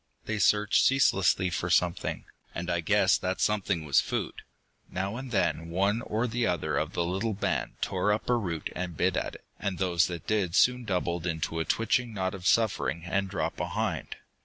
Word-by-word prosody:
They 110 -1 -2
searched 105 +1 +4
ceaselessly 95 -8 +3
for 85 +1 -2
something, 85 0 +1 0.3
and 85 +1 -3
I 85 - +1
guessed 95 +3 +3
that 95 0 -2
something 95 -6 0
was 70 -2 +4
food. - - -3 0.5
Now 95 +3 -3
and 130 +1 -6
then 90 -6 0
one 100 +6 +1
or 110 +1 -1
the 120 0 0
other 80 -4 -1
of 75 +3 -1
the 85 - 0
little 95 +5 -1
band 100 - -1
tore 95 +2 +1
up 105 +1 -1
a 125 - +3
root 85 -9 -3
and 90 -2 -4
bit - - +2
at - - -2
it, - - -14
and 100 -3 -2
those 90 -3 +2
that 85 -2 -6
did 95 -5 0
so 125 - +6
soon 125 -1 -9
doubled 90 -3 -1
into 80 -1 -2
a 80 - -1
twitching 115 0 0
knot 95 -1 -1
of 95 -1 -4
suffering 85 - +1
and 95 +2 -1
dropped 100 - -2
behind. - - -2
95 Hz, 195 wpm, -28 LUFS, 85-105 Hz, 0.5 s, so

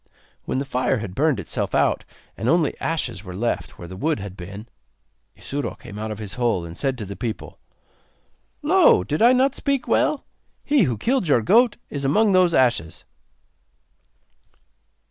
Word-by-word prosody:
When - - -2
the 135 - -1
fire 130 0 0
had 105 -4 -6
burned 150 +4 +1
itself - - -3
out - - +2 0.3
and 115 - -2
only 165 -3 +2
ashes 160 - -2
were 90 -3 -8
left 115 +5 -2
where 85 - -9
the 95 - -9
wood 155 +7 -1
had 100 -1 -7
been, 100 +4 -9 0.7
Isuro 135 -8 -4
came 105 - -10
out 110 +1 -4
of 110 - -5
his 105 -2 -6
hole, 110 -8 +1
and 85 0 -9
said 135 +5 -1
to 110 - -5
the 100 +1 -7
people: 115 -1 -6 1.0
'Lo! - - +5
did 150 - -2
I 235 +2 +7
not 260 +1 +3
speak 280 -3 -1
well? 300 - +1 0.4
He 285 -8 +3
who 120 -6 -1
killed 245 - 0
your 125 -6 +3
goat 235 - +4
is 140 -1 -3
among 205 +10 +3
those 185 -2 +4
ashes. 115 -11 +1
130 Hz, 170 wpm, -23 LUFS, 100-170 Hz, 1.0 s, I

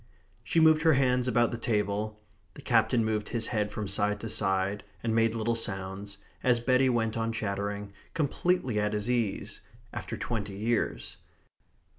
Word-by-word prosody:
She 165 - +1
moved 160 -1 +6
her 160 0 +5
hands 125 -2 +2
about 120 -2 +3
the 120 - -4
table; 105 -1 -1 0.4
the - - -11
Captain 115 0 +3
moved 110 -1 -1
his 115 -2 0
head 105 -3 -1
from 105 -1 -4
side 105 +1 +1
to 115 - -4
side, 95 -1 +1 0.2
and 115 -1 0
made 115 0 +2
little 115 +1 0
sounds, 100 -2 -4 0.2
as 125 -2 +3
Betty 130 +2 +3
went 115 -2 0
on 115 0 -1
chattering, 100 -1 -3 0.2
completely 160 -4 +1
at 105 0 0
his 105 +3 -1
ease 115 -5 -1 0.3
after - - -5
twenty 105 -4 -3
years. 105 - -1
110 Hz, 160 wpm, -29 LUFS, 105-120 Hz, 0.4 s, moved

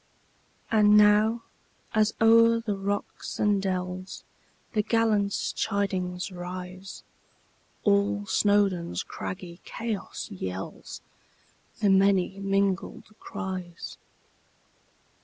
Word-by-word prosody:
And 210 -1 +6
now, 210 +2 +5 0.5
as 215 0 +2
o'er 230 +1 +6
the 220 -3 -2
rocks 200 +1 -4
and 205 -2 +2
dellsThe 185 +3 -5
gallant 220 -3 +3
chidings 190 -3 -2
rise, 180 +1 -7 0.8
All 200 0 +2
Snowdon's 200 -4 +1
craggy 180 -1 -7
chaos 225 -3 -5
yellsThe 95 0 -6 0.9
many 195 0 +3
mingled 195 +1 -1
cries! 185 -4 -6
200 Hz, 75 wpm, -27 LUFS, 185-210 Hz, 0.9 s, And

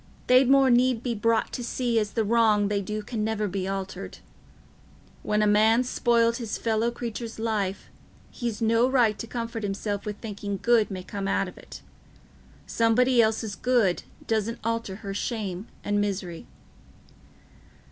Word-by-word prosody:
They'd 255 0 +5
more 270 -1 +5
need 245 -1 +3
be 245 - -1
brought 230 +1 0
to 245 - -4
see 240 -1 0
as 210 -1 -3
the 225 - +1
wrong 215 -2 +3
they 205 -1 0
do 210 +2 -4
can 215 0 -3
never 215 -1 -1
be 190 0 -3
altered. 195 -1 -5 1.0
When 210 0 +1
a - - +3
man's 220 +4 +4
spoiled 235 -1 +2
his 230 -4 -4
fellow 225 0 0
creatur's 235 -1 -6
life, 215 -4 -2 0.4
he's 235 -2 -4
no 230 +3 +3
right 235 -6 +2
to 230 - -5
comfort 230 0 -4
himself 205 0 -3
with 210 -1 -5
thinking 205 -2 -5
good 235 -3 +3
may 185 -2 -6
come 195 +1 -5
out 195 0 +1
of 180 - -10
it. - - -12 0.8
Somebody 240 +2 +3
else's 220 -2 0
good 240 -8 +2 0.2
doesn't 225 +1 -1
alter 230 -3 -2
her 195 - -3
shame 205 -2 -3 0.2
and 205 0 +1
misery." 190 -4 -4
220 Hz, 155 wpm, -26 LUFS, 205-235 Hz, 1.0 s, They'd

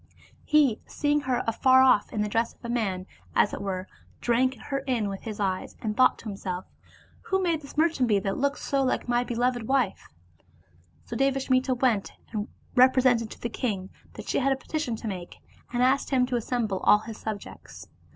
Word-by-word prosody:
He 290 -8 +3
seeing 295 0 +1
her 250 - +1
afar 260 +3 +5
off 255 -6 +4
in 210 - -1
the - - -1
dress 225 +2 0
of - - -15
a - - -4
man, 195 -6 -1 0.3
as - - +3
it - - -4
were, 190 -1 -3 0.3
drank 255 +2 +2
her 275 +5 -3
in 230 -6 0
with 195 -1 -6
his 215 -2 -6
eyes, 190 -2 -2
and 215 -1 -3
thought 255 - +4
to - - -15
himself, 190 -3 -4 0.3
" - - -28
Who 385 - +1
may 350 -3 +1
this 290 -2 -13
merchant 310 -6 +2
be 210 - +4
that 195 0 -1
looks 280 +1 -1
so 275 -1 +1
like 255 - -1
my 240 0 +2
beloved 245 -1 -1
wife?" 270 -1 0 1.0
So - - -6
Devasmita 265 -1 +1
went 240 -5 +1 0.2
and 215 -1 -3 0.3
represented 255 -3 +4
to - - -11
the - - -1
king 200 -5 -3 0.2
that - - -9
she - - +1
had 275 0 +2
a - - +3
petition 270 -2 -3
to 225 - -7
make, 180 -4 -6 0.4
and 245 0 +1
asked 265 +2 +2
him 255 -2 +3
to 250 0 -2
assemble 230 -4 -1
all - - +6
his 220 0 -8
subjects. 215 -2 -7
240 Hz, 200 wpm, -27 LUFS, 210-260 Hz, 1.0 s, all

